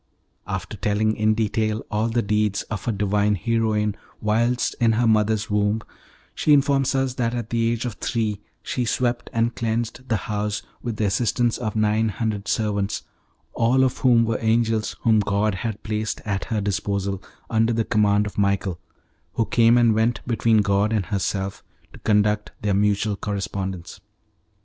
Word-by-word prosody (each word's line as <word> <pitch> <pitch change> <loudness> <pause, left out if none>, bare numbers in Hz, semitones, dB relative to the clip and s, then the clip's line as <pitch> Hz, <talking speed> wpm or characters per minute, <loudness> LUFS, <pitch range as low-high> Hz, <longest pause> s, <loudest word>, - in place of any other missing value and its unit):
After 95 +1 -4
telling 105 +2 +1
in 110 0 +2
detail 110 0 -1
all 110 +2 0
the 120 +1 0
deeds 105 0 0
of 105 -3 -6
her 120 - +1
divine 105 0 +1
heroine 110 -1 0 0.2
whilst 120 +3 +1
in 115 -1 +4
her 120 +2 +2
mother's 110 -1 +2
womb, 105 +1 +1 0.5
she 150 - +3
informs 140 -1 +3
us 135 -1 0
that 120 -2 -1
at 120 -2 -5
the 115 -1 +1
age 120 +1 -2
of 120 - -3
three 110 -4 -2 0.2
she 125 - -2
swept 120 +1 -1
and 115 +1 +1
cleansed 115 +2 -3
the 115 - +2
house 105 0 -2 0.2
with 120 -3 -3
the 110 - 0
assistance 120 +3 +1
of 110 -3 -3
nine 110 +1 +2
hundred 105 0 -3
servants, 105 -2 -1 0.5
all 125 +3 +3
of 130 - 0
whom 120 -3 +4
were 115 -1 -1
angels 110 -1 +1
whom 110 -2 +4
God 100 +1 +1
had 110 +2 -4
placed 110 0 -2
at 100 -2 -2
her 110 -2 -1
disposal, 100 -1 -2 0.3
under 115 0 +2
the 115 -1 0
command 105 -1 +2
of 105 - -5
Michael, 100 -3 0 0.5
who 115 - +1
came 115 +1 +4
and 120 -2 +4
went 110 +2 0
between 115 -3 +2
God 100 +2 +2
and 105 -4 0
herself 95 +1 -2 0.3
to - - -12
conduct 105 0 +1
their 105 -1 +1
mutual 105 +1 +1
correspondence. 95 -3 -4
110 Hz, 165 wpm, -23 LUFS, 105-115 Hz, 0.5 s, in